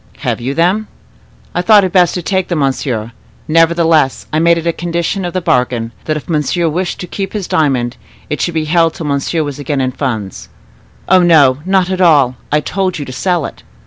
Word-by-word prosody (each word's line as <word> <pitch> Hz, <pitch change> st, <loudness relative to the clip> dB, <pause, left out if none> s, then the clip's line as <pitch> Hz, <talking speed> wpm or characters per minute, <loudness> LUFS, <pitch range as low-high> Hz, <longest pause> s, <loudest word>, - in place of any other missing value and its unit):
"Have -, -, -2 dB
you 135 Hz, +4 st, -3 dB
them?" 185 Hz, +6 st, +1 dB, 0.7 s
"I 175 Hz, -, 0 dB
thought 210 Hz, +1 st, +6 dB
it 185 Hz, -, -1 dB
best 180 Hz, -2 st, +3 dB
to 180 Hz, -, -3 dB
take 190 Hz, 0 st, -1 dB
them, 175 Hz, -, -2 dB
monsieur; 130 Hz, -5 st, -1 dB, 0.4 s
nevertheless, 165 Hz, -3 st, +2 dB
I 155 Hz, -, +2 dB
made 170 Hz, +1 st, +4 dB
it 165 Hz, -, -4 dB
a 170 Hz, -, +1 dB
condition 170 Hz, +3 st, -2 dB
of 175 Hz, -, -4 dB
the 185 Hz, -, -1 dB
bargain, 125 Hz, -5 st, 0 dB
that 155 Hz, -1 st, -1 dB
if 150 Hz, -, -9 dB
monsieur 165 Hz, +2 st, 0 dB
wished 175 Hz, +3 st, -2 dB
to -, -, -4 dB
keep 195 Hz, +1 st, -5 dB
his 205 Hz, -4 st, -3 dB
diamond, 130 Hz, -6 st, 0 dB, 0.3 s
it 150 Hz, -, -3 dB
should 175 Hz, -, -1 dB
be 155 Hz, -1 st, 0 dB
held 165 Hz, +1 st, +2 dB
till 165 Hz, -, -6 dB
monsieur 145 Hz, +3 st, -1 dB
was 145 Hz, -1 st, -6 dB
again 145 Hz, 0 st, -2 dB
in 130 Hz, -1 st, 0 dB
funds." 110 Hz, -8 st, -4 dB, 0.6 s
"Oh, 185 Hz, -1 st, +5 dB
no, 145 Hz, -7 st, +5 dB
not 190 Hz, -1 st, +2 dB
at 185 Hz, 0 st, -1 dB
all: 145 Hz, -8 st, +4 dB, 0.2 s
I 150 Hz, +1 st, +2 dB
told 190 Hz, +2 st, -2 dB
you 145 Hz, -, -5 dB
to 130 Hz, -, -8 dB
sell 175 Hz, +2 st, 0 dB
it." -, -, -9 dB
165 Hz, 210 wpm, -14 LUFS, 140-175 Hz, 0.7 s, thought